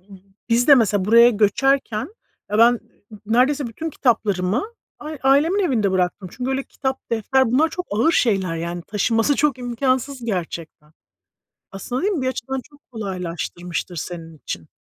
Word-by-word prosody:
b 195 0 -16 0.3
biz 235 +2 +3
de 285 - +10
mesela, 205 -5 +2
buraya 235 +3 +7
göçerken 230 - +1 0.4
ya, 210 - 0
ben 235 +2 +7 0.4
n 215 - -11
neredeyse 255 +5 +2
bütün 315 +8 -5
kitaplarımı 215 -4 +1 0.4
a 300 - -7
ailemin 285 +8 +3
evinde 220 - +1
bıraktım. 185 0 -1
Çünkü 255 +1 -4
öyle 270 +1 -1
kitap, 265 -1 -5
defter, 245 +4 +2
bunlar 305 +6 +4
çok 360 +2 -5
ağır 230 +11 +2
şeyler. 195 - +1
Yani, 170 +1 -4
taşınması 225 +6 +1
çok 290 -3 +1
imkansız 255 +1 -1
gerçekten. 165 -6 -5 0.8
Aslında, 245 +6 -4
değil 400 +3 +1
mi, 310 - -2
bir 255 - -1
açıdan 260 +1 -3
çok 290 - -19
kolaylaştırmıştır 180 -4 -5
senin 165 0 -7
için. 85 - -7
230 Hz, 155 wpm, -21 LUFS, 190-265 Hz, 0.8 s, de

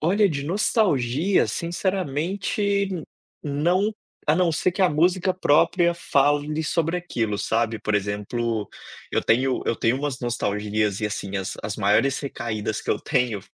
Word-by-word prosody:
Olha 200 +6 +3
de 140 -5 -3
nostalgia, 170 - +2
sinceramente, 190 +3 -1 0.5
não, 175 +9 +1 0.4
a 150 - +5
não 175 -2 +2
ser 170 +3 +1
que 190 +3 -6
a 185 - +5
música 180 +4 +2
própria 170 +1 +3
fale 145 -1 +1
sobre 165 +2 0
aquilo, 115 -12 -2
sabe. 110 0 -1
Por 105 -1 +1
exemplo, 105 +2 -2 0.4
eu - - +1
tenho 130 +2 +2
eu - - +2
tenho 115 +2 +1
umas 140 -2 -3
nostalgias 105 -3 -1
e, 105 - 0
assim, 100 -1 -4
as 95 0 -4
as 105 - -3
maiores 110 +6 +2
recaídas 110 -6 -3
que - - -3
eu - - 0
tenho, 125 -8 0
145 Hz, 145 wpm, -24 LUFS, 110-175 Hz, 0.5 s, a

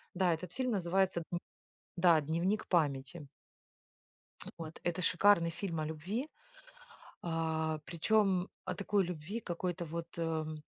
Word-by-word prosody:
Да, 180 -2 +3
этот 165 +1 -5
фильм 255 -1 0
называется 190 -2 +2
дн 175 - 0 0.6
да, 170 -3 +6
"Дневник 170 +8 0
Памяти". 145 -2 +1 1.3
Вот, 160 -1 -7
это 175 +1 0
шикарный 180 -1 +5
фильм 170 -1 -3
о 155 - -1
любви, 180 - -3 0.9
а, 160 -1 0
причем 190 +1 +2 0.2
о 185 - -2
такой 200 +1 +1
любви, 180 +5 -4
какой-то 175 -2 -3
вот, 165 +1 -4
эм, 155 -2 -2
170 Hz, 125 wpm, -34 LUFS, 160-190 Hz, 1.3 s, да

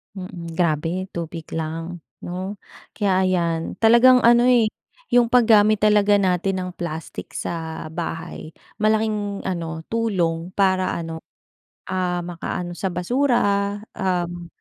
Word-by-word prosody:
Mm, 175 -3 -7
grabe 170 +2 0
tubig 165 -1 -6
lang, 165 +2 -4 0.2
'no? 185 +3 -5 0.4
Kaya 190 -3 +2
ayan, 170 -3 0
talagang 240 +2 +7
ano 240 +1 +6
eh, 240 -4 +4 0.4
yung 240 -1 +5
paggamit 215 -3 +5
talaga 210 -1 +5
natin 185 0 +1
ng 180 - -4
plastic 160 -2 -6
sa 160 -1 -4
bahay, 165 -1 -6 0.3
malaking 215 -2 0
ano 165 -3 -4
tulong 180 -7 -1
para, 185 -2 +2
ano, 165 -1 -6 0.6
ah, 180 -1 -1
makaano 175 0 -5
sa 190 +3 -2
basura. 200 0 +1 0.2
Um 175 -3 -2
185 Hz, 115 wpm, -22 LUFS, 170-210 Hz, 0.6 s, talagang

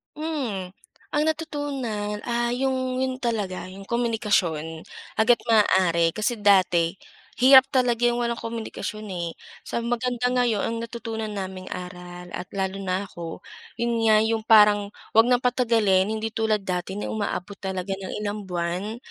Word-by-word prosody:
Mhm. 270 - -3 0.4
Ang 295 +1 +2
natutunan, 270 -10 -3
ah, 240 0 0
'yong 260 0 -1
'yon 260 0 -1
talaga 210 -7 -2
'yong 195 +1 -10
komunikasyon, 200 -10 0 0.3
hanggat 230 0 +4
maaari. 185 -6 +4
Kasi 215 +2 -1
dati, 180 -4 +4 0.5
hirap 265 0 +9
talaga 245 -2 +2
'yung 240 0 +2
walang 235 0 -1
komunikasyon 220 -2 -5
eh. 170 -2 -4 0.3
Sa 235 - -2
maganda 245 +1 0
ngayon, 245 -4 +2
ang 230 - -2
natutunan 225 -2 -5
naming 190 -2 -5
aral 180 -1 -8
at - - -4
lalo 195 0 -2
na 190 +1 -1
ako, 165 -1 -7 0.4
'yun 235 -1 0
nga 215 -1 +6
'yung 220 0 0
parang, 210 -2 +6 0.3
huwag 225 - +8
ng 245 0 +3
patagalin 230 -6 +3
hindi 220 0 -2
tulad 220 -2 +1
dati 185 0 -3
na 205 - -4
umaabot 205 -2 -3
talaga 190 0 -3
ng 190 -1 -6
ilang 205 -1 -4
buwan, 180 +5 -3
215 Hz, 145 wpm, -25 LUFS, 190-240 Hz, 0.5 s, hirap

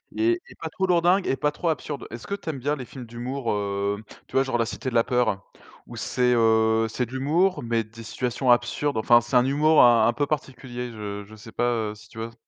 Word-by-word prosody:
Et 345 +1 +1
et - - -14
pas - - -5
trop 190 - -1
lourdingue 180 +2 +3
et 135 - +1
pas 150 +2 0
trop 170 - -2
absurde. 150 -1 -4
Est-ce 115 0 -8
que 200 - -2
tu 185 -5 -7
aimes 140 -4 -4
bien 145 +4 0
les 130 -4 -7
films 125 -1 -10
d'humour? 120 +2 -4
Heu, 100 0 -2 0.2
tu - - -22
vois 135 - +5
genre 130 -2 -1
La 115 - +1
Cité 130 +3 -4
de 120 - -7
la 115 - +5
Peur? 120 -6 0 0.4
Où - - -10
c'est, 125 -1 +1
heu, 110 0 +3
c'est 125 +2 -2
de 115 - -16
l'humour 160 +8 +1
mais 115 -1 0
des 115 +2 -13
situations 125 +2 -1
absurdes, 120 +4 +1
enfin, 120 +2 +5
c'est 120 +2 -4
un 125 +1 +5
humour 150 +3 +4
un 115 -2 +6
un 120 - +2
peu 145 - 0
particulier, 125 -4 -4
je 105 -2 -6
je 110 - -13
sais 110 +1 -12
pas, 120 - -2 0.3
heu, - - -10
si 110 +1 -16
tu 115 - -11
vois 115 - -3
s 115 - -15
125 Hz, 255 wpm, -25 LUFS, 115-145 Hz, 0.4 s, un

